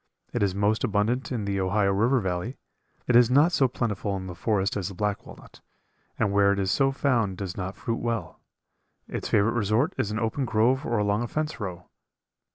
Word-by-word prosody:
It - - -1
is 100 -2 +1
most 105 +2 +1
abundant 115 +4 0
in 115 -5 -2
the 100 -1 -1
Ohio 100 +1 +2
River 120 +7 +3
Valley. 95 +5 -3 0.5
It 125 - +2
is 120 -1 +7
not 145 +7 +5
so 140 -6 +3
plentiful 105 -5 -2
in 95 - -6
the 90 - -6
forest 100 +2 0
as 100 -4 -2
the 100 - -7
black 105 +1 -2
walnut, - - -14 0.6
and 100 - +1
where 100 0 +4
it 100 - 0
is 95 -1 0
so 135 -1 +3
found 120 -9 0
does 95 -2 -5
not 95 0 -4
fruit 115 -2 -3
well. 115 -8 -3 0.7
Its - - -4
favorite 105 +2 +3
resort 120 - +1
is 105 - 0
an 105 - -3
open 115 +5 -1
grove 120 +5 +2
or 120 - 0
along 105 +1 +1
a 120 - -2
fence 155 +4 -3
row. 90 -4 -6
105 Hz, 205 wpm, -26 LUFS, 100-120 Hz, 0.7 s, is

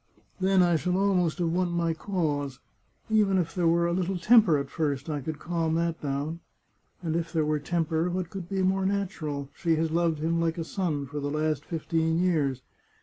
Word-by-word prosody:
" - - -27
Then 190 0 +4
I 175 -2 +3
shall 180 +3 0
almost 185 -4 +2
have 170 -3 0
won 180 0 +1
my 170 -1 0
cause. 150 -7 -2 0.5
Even 210 -3 +3
if 165 -3 -1
there 175 -2 +1
were 170 +1 +3
a 170 - +1
little 185 +1 -1
temper 210 -4 +5
at 140 - -4
first, 150 -2 -2
I 145 -1 -2
could 155 +3 -4
calm 165 0 -1
that 170 0 -1
down.... 145 +3 -3 0.6
And 160 -1 -1
if 165 -1 -2
there 160 -3 +1
were 150 0 +1
tem 165 +3 -1
per, 165 +2 0
what 180 -1 -3
could 185 -3 -7
be 190 -1 0
more 190 +1 +2
natural?... 155 -8 -3
She 165 -3 +1
has 160 0 0
loved 165 -1 +1
him 165 +2 0
like 165 0 0
a 165 - -2
son 160 -5 -2
for 145 +2 -5
the 145 0 -2
last 155 0 -1
fifteen 160 0 0
years. 150 -8 +1
165 Hz, 210 wpm, -27 LUFS, 155-180 Hz, 0.6 s, temper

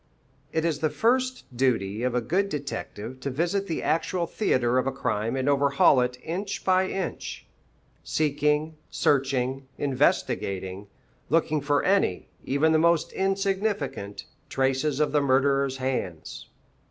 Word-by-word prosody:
It 160 0 0
is 160 -3 0
the 155 - +1
first 255 - 0
duty 115 -5 0
of 125 0 0
a 125 - +2
good 195 - 0
detective 130 - -5
to 140 - -3
visit 175 +8 -1
the 165 - -3
actual 170 +2 0
theatre 130 - +1
of 130 - -1
a - - +1
crime 115 -3 -2
and 130 0 -1
overhaul 140 -2 +4
it 125 0 -1
inch 190 +5 -4
by 185 0 +3
inch, 190 -2 -4 0.6
seeking, 150 +1 0
searching, 135 -2 0
investigating, 100 -7 0 0.4
looking 155 -1 +2
for 145 0 +1
any, 190 - +1
even 145 +4 +2
the 160 - +4
most 170 -1 +2
insignificant, 195 - -1 0.2
traces 135 +2 0
of 150 - +2
the 150 - +3
murderer's 135 0 +2
hands. 110 -12 -4
140 Hz, 135 wpm, -26 LUFS, 130-165 Hz, 0.6 s, overhaul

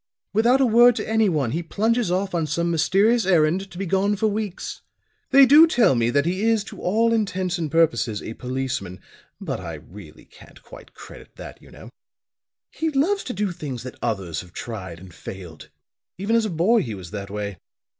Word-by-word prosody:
Without 235 +5 +3
a 270 - +4
word 240 +1 +6
to - - -4
anyone 185 - +1
he 165 - -2
plunges 220 +5 0
off 190 +2 -1
on 165 -3 -1
some 170 +3 -1
mysterious 195 +8 +2
errand, 180 +2 +2
to 175 - -12
be 195 - -3
gone 195 +3 +1
for 215 +2 -1
weeks. 210 -3 -3 0.5
They 275 0 +7
do 300 +5 +8
tell 240 - +3
me 120 -1 +1
that 140 +4 +1
he 185 +3 -1
is 225 -3 +1
to - - -11
all 225 +5 +2
intents 185 -5 -1
and 160 -2 -2
purposes 120 -9 +1
a 110 - -6
policeman. 125 -7 -4 0.4
But - - -4
I 85 -3 -6
really 80 +1 -14
can't - - -18
quite - - -15
credit - - -13
that, - - -11
you - - -17
know. - - -13 0.8
He 320 +1 -2
loves 325 +8 0
to 250 - -4
do 205 -1 -2
things 145 -8 -6
that 130 - -7
others 95 -9 -3
have 90 -1 -16
tried 95 -8 -7
and 90 -1 -14
failed. 90 -4 -10 0.5
Even 200 +5 0
as 230 -1 +2
a - - -2
boy 195 +7 +2
he 115 - -5
was 95 -2 -10
that 100 -2 -6
way. 100 -2 -5
175 Hz, 195 wpm, -23 LUFS, -, 0.8 s, do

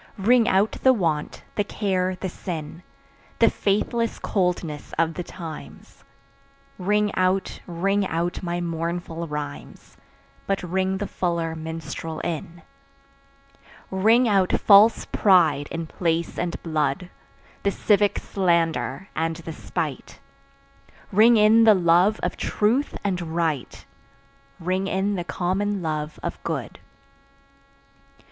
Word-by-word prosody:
Ring 230 +4 +4
out 205 -2 +3
the 260 - +6
want, 165 -9 -2
the 205 - 0
care 185 -3 -1
the 190 - -4
sin, 165 -2 -6 0.6
The - - +5
faithless 225 +3 0
coldness 175 -6 -2
of 165 0 +1
the 170 - -4
times; 155 - -10 0.8
Ring 210 +2 +1
out, 185 +1 0
ring 195 +3 0
out 170 +1 -2
my 175 -1 -2
mournful 170 0 -3
rhymes, 150 -1 -7 0.5
But 195 -1 -1
ring 190 +2 -1
the 205 - -3
fuller 170 -4 -2
minstrel 160 0 -6
in. 165 +1 -5 1.3
Ring 220 +6 +4
out 195 -4 +2
false 210 +2 +6
pride 160 -8 +3
in 165 0 -4
place 165 0 -2
and 175 -1 -2
blood, 155 +1 -1 0.5
The 200 - +1
civic 205 0 +2
slander 170 - 0
and 165 +1 -1
the 165 0 -8
spite; 155 -3 -5 0.9
Ring 225 +4 +6
in 215 +2 +6
the 220 -2 +7
love 180 +4 +3
of - - -2
truth 235 +7 0
and 190 -3 -1
right, 160 -6 -2 0.7
Ring 185 +3 -1
in 195 +1 0
the 180 -3 -2
common 190 +3 -1
love 155 -1 -3
of - - -4
good. - - -4
180 Hz, 120 wpm, -24 LUFS, 165-200 Hz, 1.3 s, the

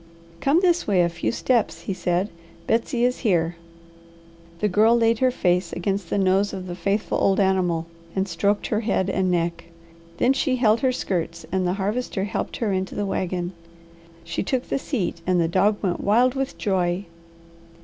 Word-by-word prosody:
"Come 295 +6 +3
this 350 -2 +2
way 190 -4 +4
a 170 - +2
few 170 - -2
steps," 235 -1 0
he 195 - -3
said. 180 +2 0 0.4
"Betsy 235 +2 +1
is 250 0 0
here." 175 -7 +1 1.0
The 210 - +2
Girl 220 +4 +4
laid 230 -1 +2
her 260 - +4
face 180 -7 +1
against 195 0 -2
the - - 0
nose 195 +1 +2
of 190 -1 -5
the 180 - -5
faithful 195 +4 -1
old 195 0 +3
animal, 185 -4 +1 0.3
and 190 0 0
stroked 200 +4 0
her 215 - 0
head 195 -4 0
and 190 -1 +1
neck. 170 -1 -1 0.5
Then 255 +7 +3
she 265 -1 +1
held 225 -3 +3
her 260 -2 +2
skirts 170 -8 -3
and 185 -1 +1
the 180 - +1
Harvester 205 +1 -2
helped 200 - -3
her 215 -4 0
into 190 0 -2
the 205 - -1
wagon. 185 -2 -2 0.7
She 170 - -3
took 255 +4 -2
the - - 0
seat, 190 - -3
and 180 -1 +3
the 165 - +2
dog 205 +5 +2
went 180 -3 -1
wild 240 +5 +4
with 270 0 -3
joy. 185 -1 0
195 Hz, 180 wpm, -23 LUFS, 180-230 Hz, 1.0 s, way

